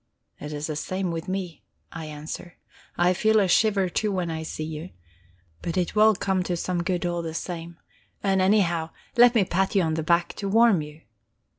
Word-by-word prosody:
"It 150 - -7
is 150 0 -4
the 155 - -3
same 185 +4 -2
with 165 0 -5
me," 185 -3 -4 0.3
I 165 -1 -6
answer. 155 +3 -8 0.4
"I 175 +1 +4
feel 220 +4 +3
a 195 - +3
shiver, 200 0 +3
too, 210 +4 -1
when 180 -3 -2
I 160 0 -4
see 155 0 -5
you. 160 +2 -6 0.7
But 170 +1 -3
it 180 +2 -1
will 215 0 +6
come 190 0 0
to 180 -1 -2
some 175 0 -1
good 175 +1 -1
all 175 -1 -1
the 165 -1 -5
same. 170 -1 -5 0.5
And, 195 -1 +2
anyhow, 175 -5 +2 0.3
let 245 0 +6
me 210 -4 +4
pat 190 +3 0
you 195 - +4
on 160 -1 0
the 160 - -1
back, 170 +2 +1
to 200 - -3
warm 225 -4 +5
you." 150 +1 -10
175 Hz, 200 wpm, -25 LUFS, 165-195 Hz, 0.7 s, will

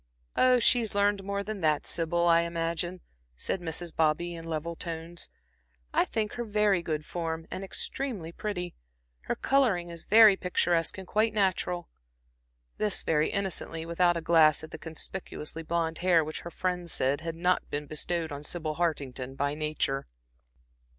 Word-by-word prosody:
"Oh, 255 0 +5
she's 235 -3 +3
learned 205 -1 +2
more 200 +1 -2
than 210 -1 -5
that, 155 -2 +2
Sybil, 170 +1 0
I 170 -1 +6
imagine," 170 +1 -2 0.4
said 180 - -2
Mrs. 170 0 -3
Bobby, 160 +2 +1
in 165 -1 -8
level 165 +1 -3
tones. 165 0 -6 0.6
"I - - +4
think 215 -2 -2
her 240 - -4
very 210 -4 +2
good 155 -2 -3
form, 165 -2 -3
and 190 - -4
extremely 195 -3 -4
pretty. 180 -2 -4 0.5
Her - - -1
coloring 220 -11 +2
is 170 -1 -7
very 215 -1 +8
picturesque, 175 -2 +1
and 190 - -7
quite 215 +3 +1
natural." 185 -3 0 0.9
This 210 -2 +1
very 155 -1 +2
innocently, 175 -4 -2
without 175 +1 +2
a - - -3
glance 160 -2 +5
at 155 - -9
the 160 - -8
conspicuously 160 -1 -5
blonde 165 0 -1
hair 175 -2 +4
which 155 +1 -5
her 170 - -7
friends 180 -1 -2
said 140 +3 +1
had 165 0 -4
not 180 +2 +1
been 145 +1 -2
bestowed 160 +2 -1
on 145 0 -6
Sybil 155 -1 -3
Hartington 135 -6 -2
by 140 +1 0
nature. 150 -3 -1
170 Hz, 160 wpm, -29 LUFS, 160-190 Hz, 0.9 s, very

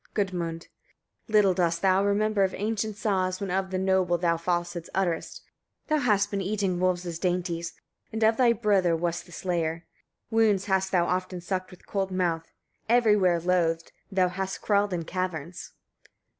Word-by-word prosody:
Gudmund. 175 -5 -2 0.7
36. - - -13
Little 205 -3 +5
dost 170 -2 0
thou 190 0 +4
remember 205 0 +2
of 190 - 0
ancient 215 0 -2
saws, 185 -4 0
when 200 -2 -3
of 190 +1 0
the 190 - -2
noble 190 -2 +2
thou 170 -1 +1
falsehoods 175 0 -2
utterest. 180 -4 -2 0.5
Thou 310 - +3
hast 205 -6 +2
been 200 -1 -1
eating 195 -2 -1
wolves' 180 -2 -1
dainties, 175 -2 -1 0.4
and 220 0 -2
of 220 +1 +5
thy 245 0 +4
brother 200 -7 +2
wast 170 +1 -2
the - - -15
slayer; 170 -2 -2 0.5
wounds 215 -4 +3
hast 190 -1 +1
thou 175 -2 +3
often 185 0 -2
sucked 185 +1 -3
with 185 - -16
cold 195 -1 -2
mouth; 175 -3 -1 0.4
every 235 -3 +5
where 180 -4 +3
loathed, 170 -2 0 0.2
thou 185 -2 +3
hast 190 +1 -4
crawled 205 -1 +2
in 170 -2 -2
caverns. 180 -2 -4
185 Hz, 165 wpm, -27 LUFS, 175-200 Hz, 0.7 s, Little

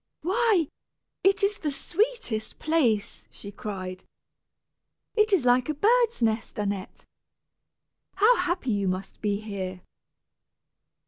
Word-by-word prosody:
"Why, 390 - +2 0.6
it 390 +1 +3
is 405 +1 +1
the 305 - -1
sweetest 345 - -2
place," 255 -10 0
she 200 - -10
cried. 185 -3 -6 1.1
"It 430 -1 +3
is 355 -10 +3
like 250 +2 +4
a 305 - 0
bird's 465 - +3
nest, 225 0 0
Annette. 200 -2 -4 1.1
How 435 +5 +5
happy 350 -7 -1
you 200 -2 0
must 185 +1 -4
be 205 -1 0
here." 190 -4 -5
260 Hz, 115 wpm, -26 LUFS, -, 1.1 s, How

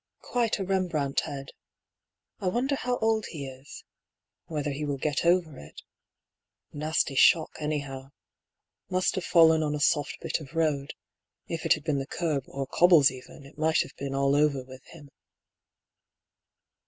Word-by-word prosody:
Quite 240 -3 0
a 195 - -3
Rembrandt 175 -7 0
head. 135 -1 -6 0.9
I 190 - -3
wonder 250 +9 0
how 250 -2 -1
old 220 -1 +1
he 145 -5 -6
is 130 +1 -11 0.3
— - - -63
whether 150 -2 -3
he 140 +2 -4
will 145 -2 -2
get 145 +1 -1
over 170 -6 +2
it? - - -12 0.9
Nasty 150 -1 0
shock, 155 +4 +5
anyhow. 140 -3 -4 0.8
Must 185 0 +1
have 185 - -3
fallen 160 -1 +5
on 150 -1 -1
a - - -3
soft 145 0 +1
bit - - -2
of 155 0 -12
road; 150 -4 0 0.5
if 165 -1 -3
it - - +6
had 155 - -6
been 150 -4 0
the 135 - -5
kerb, 150 -6 -2
or 135 0 -4
cobbles 165 -2 +5
even, 130 +2 -12
it 140 +2 -16
might 160 0 +3
have - - -14
been 135 0 -5
all 140 0 +2
over 145 -3 +2
with 130 0 -13
him." 150 -4 -14
150 Hz, 165 wpm, -27 LUFS, 140-170 Hz, 0.9 s, it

